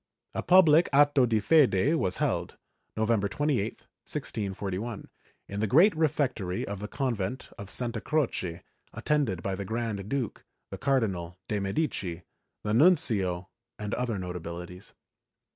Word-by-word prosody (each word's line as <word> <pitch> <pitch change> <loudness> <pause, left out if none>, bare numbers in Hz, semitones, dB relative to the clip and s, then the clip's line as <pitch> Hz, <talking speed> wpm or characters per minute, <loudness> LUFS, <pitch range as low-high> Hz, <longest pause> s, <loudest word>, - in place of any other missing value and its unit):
A - - -2
public 170 -3 +6
atto 145 -2 +5
di 110 -2 +2
fede 135 - +4
was 95 - 0
held, - - -1 0.4
Novem 110 0 +2
ber 100 - 0
28, 125 -2 -1 0.2
1641, 100 +1 -4 0.4
in 100 - -5
the 110 - +1
great 165 - +5
refectory 135 - 0
of 100 -1 -5
the 105 - -5
convent 120 -3 -3
of 100 -2 -8
Santa 120 -1 -2
Croce, 115 - -1 0.3
attended 125 - 0
by 95 - -1
the 95 +1 -3
Grand 110 -1 -3
Duke, 135 -5 -3 0.3
the - - -6
Cardinal 95 -11 0
de' 105 - -1
Medici, 95 - -2 0.4
the 105 - -1
nuncio 110 - +3 0.3
and 105 -1 -4
other 120 -4 -1
notabilities. 90 0 -7
110 Hz, 135 wpm, -28 LUFS, 95-140 Hz, 0.4 s, public